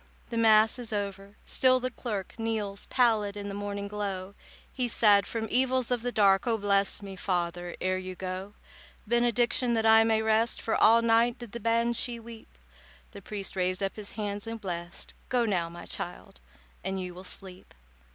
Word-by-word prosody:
The 230 - -2
Mass 220 +1 +5
is 235 -2 -6
over—still 205 +5 0
the 255 0 -3
clerk 210 -6 -5
Kneels 215 -3 -3
pallid 220 -5 +2
in 205 0 -5
the - - -5
morning 200 0 -4
glow. 200 -2 -4 0.4
He 250 -2 -1
said, 205 -4 +4
"From 225 -1 -3
evils 255 -1 +2
of 245 -2 +1
the 245 +1 -2
dark 200 -1 +3
Oh, 230 -1 +2
bless 200 -1 +1
me, 195 -1 -7
father, 175 -1 -2
ere 185 0 0
you 185 0 -6
go. 190 +2 -5 0.5
"Benediction, 240 +1 +2
that 225 0 +1
I 225 0 +7
may 220 -1 +2
rest, 220 +2 +2
For 225 - -1
all 230 +1 +5
night 230 +1 +3
did 240 -3 -10
the 235 - -6
Banshee 235 +1 0
weep." 225 - -13 0.5
The - - -10
priest 200 -2 -5
raised 185 +1 0
up 195 - -2
his 210 -2 -7
hands 205 -1 -4
and 225 0 -5
blest— 175 -3 -6 0.2
"Go 245 -2 +2
now, 175 -6 0
my 175 +1 -10
child, - - -7 0.4
and 190 0 -2
you 180 -1 -5
will 180 +1 -10
sleep." 185 -1 -9
210 Hz, 180 wpm, -28 LUFS, 195-230 Hz, 0.5 s, I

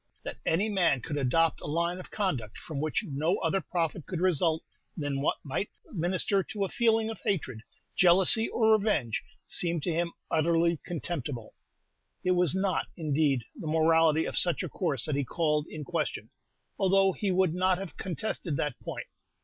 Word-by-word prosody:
That - - -7
any 185 +7 +2
man 175 - +2
could 145 +3 -3
adopt 160 +5 +2
a - - -6
line 170 +4 0
of 185 - -10
conduct 130 - -2
from 150 -4 -5
which 155 +8 0
no 155 +6 0
other 195 - 0
profit 170 -3 -2
could 180 - -3
result 165 -3 +2 0.3
than 145 -3 -2
what - - +1
might 145 +9 -2 0.2
minister 185 +2 +1
to 200 +1 -3
a - - -5
feeling 225 -1 +2
of 225 - -8
hatred, 165 - -1 0.4
jealousy, 185 +5 +5
or 220 -2 +3
revenge, 205 - +2 0.2
seemed 170 -3 0
to 175 - 0
him 170 +1 -1 0.2
utterly 165 0 +2
contemptible. 145 -8 -4 0.7
It 185 - +2
was 180 -1 +4
not, 190 0 0
indeed, 150 -5 +1
the 160 - -7
morality 160 0 +4
of - - -4
such 175 -4 +2
a - - -4
course 140 - -1
that 155 - 0
he 140 - +1
called 150 +2 0
in 155 -1 -6
question, - - -3 0.5
although 195 0 +4
he 205 - -2
would 185 -2 +2
not 185 +1 +2
have 195 -2 -7
contested 185 -4 -3
that 150 -4 -2
point. - - -6
170 Hz, 175 wpm, -29 LUFS, 150-190 Hz, 0.7 s, jealousy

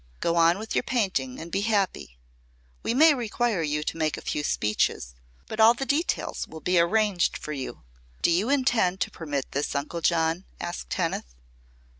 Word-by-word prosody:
Go 170 - 0
on 170 +1 +5
with 220 +2 -5
your - - +3
painting 185 - -1
and 170 +1 -8
be 195 - 0
happy. 200 - -1 0.6
We 230 - -1
may 310 +3 +7
require 235 -5 -1
you 150 -1 -1
to 165 - -3
make 155 -2 0
a - - -7
few 150 - -2
speeches, 105 - 0 0.3
but 220 - -7
all 225 +2 +7
the 270 - -3
details 305 +6 -1
will 160 - -9
be 180 +2 +2
arranged 195 +1 +2
for 150 - -6
you." 135 - -6 0.4
"Do - - +4
you 190 +8 +1
intend 240 -10 +2
to - - 0
permit 145 -5 -4
this, 140 +1 -2
Uncle 150 +4 -3
John?" 165 +2 +1
asked 175 0 -5
Kenneth. 165 - -2
175 Hz, 180 wpm, -26 LUFS, 155-220 Hz, 0.6 s, may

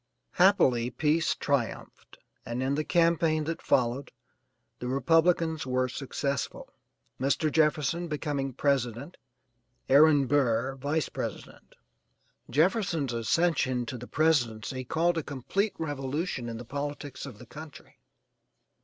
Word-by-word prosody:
Happily 130 -11 +4
peace 155 +6 +1
triumphed, 140 -5 -3 0.3
and 120 +2 -3
in 135 +1 0
the 155 +2 0
campaign 165 -2 +2
that 165 +2 -4
followed, 125 +2 +1 0.7
the 125 - -4
Republicans 160 +3 +2
were 130 0 +1
successful, 140 +2 -4 0.5
Mr. 140 +4 +1
Jefferson 155 +2 +1
becoming 145 -3 -2
president 135 +2 -1 0.7
Aaron 145 0 +6
Burr 130 -2 +1
vice 145 +3 -1
president. - - -7 0.7
Jefferson's 165 - +1
ascension 130 0 +1
to 120 - -6
the 125 - -9
presidency 130 -5 0
caused 165 +6 +1
a - - +1
complete 185 - -2
revolution 145 -3 -3
in 115 - -5
the 120 - -8
politics 145 0 -5
of 125 -6 -10
the 125 - -12
country. 150 +5 -12
140 Hz, 115 wpm, -28 LUFS, 130-160 Hz, 0.7 s, Aaron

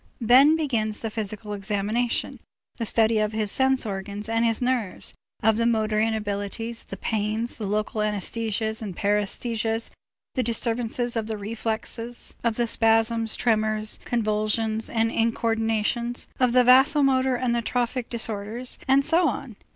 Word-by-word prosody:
Then 260 +6 +6
begins 230 -9 -1
the 225 - -3
physical 210 -1 -4
examination, 205 +4 -1 0.4
the 230 - -2
study 220 0 +3
of 215 0 0
his 215 -2 0
sense 265 -1 +2
organs 200 +1 -5
and 225 +1 +1
his 225 -1 +2
nerves, 245 -6 -1 0.3
of 220 0 +4
the 230 0 +2
motor 215 -2 +1
inabilities, 220 +1 -2
the - - -8
pains, 220 +2 -2
the 210 - -3
local 215 +1 -1
anæsthesias 220 +1 -2
and 195 -5 -6
paræsthesias, 220 +2 0 0.4
the 255 - 0
disturbances 235 +1 0
of 225 -1 -1
the 220 -1 -3
reflexes, 230 +2 -4
of 230 -2 +1
the 240 - +1
spasms, 225 0 +2
tremors, 215 -2 0
convulsions, 220 -1 -1
and 225 0 +1
incoördinations, 225 +1 0
of 250 -2 +3
the 250 0 +6
vasomotor 265 0 +5
and 240 -1 0
trophic 245 +1 -2
disorders, 225 +1 -2
and 270 +1 +4
so 335 +2 +3
on. 245 -2 -6
225 Hz, 140 wpm, -25 LUFS, 215-240 Hz, 0.4 s, Then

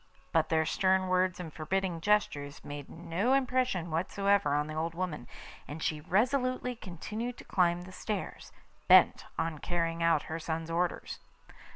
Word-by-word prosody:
But 160 -1 +2
their 160 -1 +2
stern 185 +3 +2
words 185 0 +2
and 165 -4 -6
forbidding 175 +1 -1
gestures 150 -8 0
made 145 -1 -7
no 175 +9 -1
impression 255 -10 +1
whatever 195 0 +2
on 150 0 +1
the 155 - -6
old 160 +2 -2
woman, 170 -9 -3 0.4
and 150 +2 -6
she 155 -1 -1
resolutely 250 - +1
continued 220 +5 -5
to - - -10
climb 175 -2 +2
the 185 - -11
stairs, 205 +1 -5 0.4
bent - - +6
on 165 -2 -2
carrying 170 -1 -1
out 165 -2 +3
her 160 +1 -5
son's 165 0 -3
orders. 175 +1 -1
175 Hz, 155 wpm, -31 LUFS, 160-200 Hz, 0.4 s, bent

